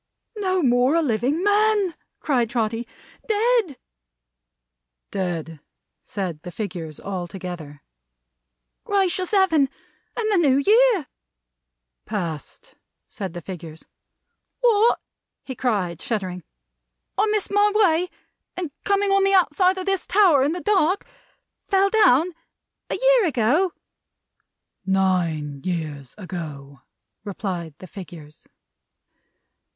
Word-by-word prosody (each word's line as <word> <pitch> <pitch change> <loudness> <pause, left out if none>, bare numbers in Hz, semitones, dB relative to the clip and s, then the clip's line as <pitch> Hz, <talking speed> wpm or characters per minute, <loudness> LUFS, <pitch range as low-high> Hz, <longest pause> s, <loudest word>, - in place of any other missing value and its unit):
"No 375 -3 +1
more 250 +3 +3
a 335 - +4
living 265 - 0
man!" 410 -2 +3 0.3
cried 245 -7 +1
Trotty. 230 0 -1 0.4
"Dead!" 440 - +1 1.3
"Dead!" 165 -5 -3 0.4
said 180 -6 -5
the 175 - -8
figures 175 -7 -6
altogether. 175 -6 -6 1.0
"Gracious 375 -2 +1
Heaven! 335 -9 +3 0.5
And 435 -2 0
the 285 - +4
New 260 - +4
Year 450 - +5 0.5
' - - -59
"Past," 170 -9 -5 0.3
said 190 -4 -6
the 175 - -6
figures. 165 -4 -9 0.8
"What!" 465 -1 +4 0.4
he 265 - -6
cried, 200 -10 -1
shuddering, 190 -8 -3 0.7
"I 420 +3 +2
missed 425 -2 -1
my 410 +1 +4
way, 365 -4 +3 0.5
and 350 -5 -3
coming 400 0 +1
on 390 0 +4
the 390 0 +4
outside 370 +1 +3
of 370 - -4
this 390 -2 -1
tower 370 -8 +5
in 285 +4 +2
the 355 - -4
dark, 375 +1 +2 0.6
fell 390 0 +3
down 350 - +4 0.6
a - - -1
year - - +4
ago?" 300 - +2 1.1
"Nine 175 -7 0
years 155 -7 -4
ago!" 150 -8 -7 0.4
replied 180 -6 -5
the - - -11
figures. 165 -5 -11
250 Hz, 110 wpm, -23 LUFS, -, 1.3 s, Year